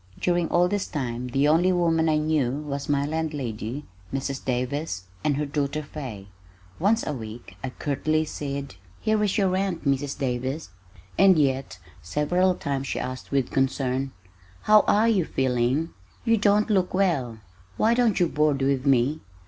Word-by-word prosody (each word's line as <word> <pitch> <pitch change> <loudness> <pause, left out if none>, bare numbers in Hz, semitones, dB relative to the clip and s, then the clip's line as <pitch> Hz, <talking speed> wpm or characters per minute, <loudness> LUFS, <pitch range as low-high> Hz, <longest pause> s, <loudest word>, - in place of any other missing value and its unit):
During 175 -1 +1
all 175 +1 +4
this 205 +1 -1
time 125 -3 -3
the 135 +4 +2
only 170 +5 +4
woman 165 -2 +2
I 155 - +3
knew 150 -4 +1
was 145 0 -4
my 140 -1 +2
landlady, 145 -5 -3 0.3
Mrs. 135 0 -3
Davis, 130 - -2 0.2
and 145 -2 +1
her 150 - 0
daughter 145 +1 -2
Fay. 125 -10 -7 0.5
Once 215 +6 +2
a 150 - -2
week 110 -5 -8
I 130 - -2
curtly 155 +4 -1
said, 140 -3 -5 0.3
"Here 215 -1 +1
is 205 0 +1
your 195 -3 +3
rent, 185 -3 -1
Mrs. 140 0 0
Davis," 130 - -3 0.5
and 190 -2 +7
yet, 135 -6 0 0.2
several 175 - +1
times 135 -3 -3
she - - -2
asked 130 0 -5
with 135 -3 0
concern, 135 0 0 0.5
"How 215 0 +7
are 215 +2 +4
you 210 -6 +3
feeling? 130 +3 0 0.4
You 230 - +4
don't 210 +1 +3
look 185 -3 +1
well. 150 - +1 0.4
Why 225 +2 +3
don't 235 -4 +2
you 175 - +4
board 150 -3 +1
with 135 0 +1
me? 135 +3 +3
145 Hz, 160 wpm, -25 LUFS, 135-175 Hz, 0.5 s, and